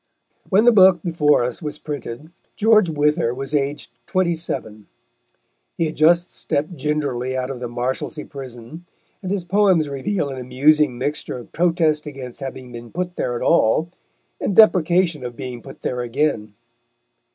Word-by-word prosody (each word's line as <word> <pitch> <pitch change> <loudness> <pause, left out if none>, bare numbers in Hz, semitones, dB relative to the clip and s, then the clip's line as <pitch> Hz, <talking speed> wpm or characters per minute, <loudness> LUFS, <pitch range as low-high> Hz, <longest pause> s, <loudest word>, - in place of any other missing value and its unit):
When 200 +2 +4
the 240 - +8
book 185 -5 +6
before 150 -6 +2
us 125 +5 -3
was 150 -2 -4
printed, 150 0 -7 0.2
George 215 -4 +4
Wither 150 -4 +1
was 135 +3 -5
aged 145 0 -1 0.2
twenty 185 -2 +1
seven. 110 -10 -5 0.9
He 165 - +1
had 155 - -4
just 170 +3 +3
stepped 155 +5 -3
gingerly 140 -5 -2
out 130 +1 -2
of 130 - -7
the 120 - -4
Marshalsea 125 +5 -3
Prison, 135 +2 -9 0.4
and 190 - -5
his 195 -2 -1
poems 185 -3 +3
reveal 140 +4 -2
an 135 -1 -6
amusing 135 +2 +2
mixture 145 +1 -3
of 120 - -11
protest 165 -3 +1
against 130 -4 -8
having 130 -2 -7
been 120 -1 -10
put 180 0 -4
there 120 - -2
at - - -3
all 155 +9 +3 0.5
and 195 - -1
deprecation 175 - +4
of 120 -1 -6
being 125 0 -7
put 135 - -12
there 125 -1 -2
again. 115 -4 -1
150 Hz, 160 wpm, -21 LUFS, 125-170 Hz, 0.9 s, the